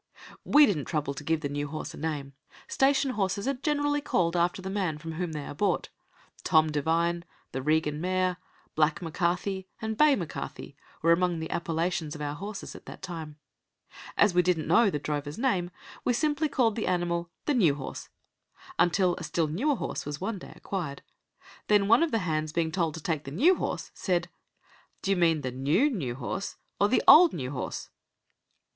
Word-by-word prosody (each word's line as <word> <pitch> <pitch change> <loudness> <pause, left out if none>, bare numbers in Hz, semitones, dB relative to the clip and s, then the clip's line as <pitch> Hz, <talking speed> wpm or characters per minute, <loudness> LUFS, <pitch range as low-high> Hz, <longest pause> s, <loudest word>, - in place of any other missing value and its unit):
We 295 +1 +7
didn't 160 - -1
trouble 150 -3 -2
to 140 - -8
give 160 +1 0
the 145 - -1
new 145 +1 -3
horse 155 +2 -6
a - - -10
name. 145 -3 -4 0.3
Station 270 0 +2
horses 200 0 -1
are 275 - +2
generally 290 +2 0
called 175 - +1
after 175 +2 +1
the 190 0 -5
man 185 -6 -1
from 160 +1 -7
whom 165 0 -3
they 150 -2 -5
are - - -6
bought. 185 +4 0 0.5
"Tom 155 0 +4
Devine", 165 +3 +1 0.3
"The 130 - -3
Regan 150 +1 +1
mare", 185 0 0 0.4
"Black 160 +5 +1
M'Carthy" 180 +3 -1
and 220 0 -3
"Bay 300 +3 +5
M'Carthy" 175 - -6 0.3
were 165 - +5
among 175 0 +2
the 160 - -5
appellations 165 -1 -1
of 150 - -8
our 145 0 -2
horses 200 +6 -7
at - - -13
that - - -10
time. 160 -5 -6 0.8
As 205 -3 +5
we 180 - +5
didn't 175 -3 +1
know 230 -3 +5
the 150 - -1
drover's 145 0 -4
name, 200 -9 +1 0.3
we 245 - +2
simply 300 +4 +1
called 235 -6 +2
the 220 - -2
animal 175 -1 0 0.2
"The 295 - +2
new 175 - +4
horse" 135 -2 -7 0.7
until 180 0 +3
a 180 - -6
still 165 0 0
newer 230 - 0
horse - - -4
was 145 0 -5
one 195 +1 -3
day - - -11
acquired. 165 -8 -5 0.6
Then, 205 -1 +4
one 230 +6 +6
of 335 - +3
the 225 - +1
hands 155 -2 -1
being 165 0 0
told 165 -3 0
to 160 - -8
take 155 -4 -1
the - - -5
new 275 - +4
horse, - - -3
said, 175 -2 -1 0.7
"D'yer 195 0 +2
mean 165 -4 +3
the 130 -2 -3
new 145 - +2
new 135 - -3
horse 185 +9 -4 0.2
or 205 - +4
the 255 - +2
old 335 +1 +9
new 130 -5 -4
horse?" 130 - -5
175 Hz, 190 wpm, -28 LUFS, 155-205 Hz, 0.8 s, old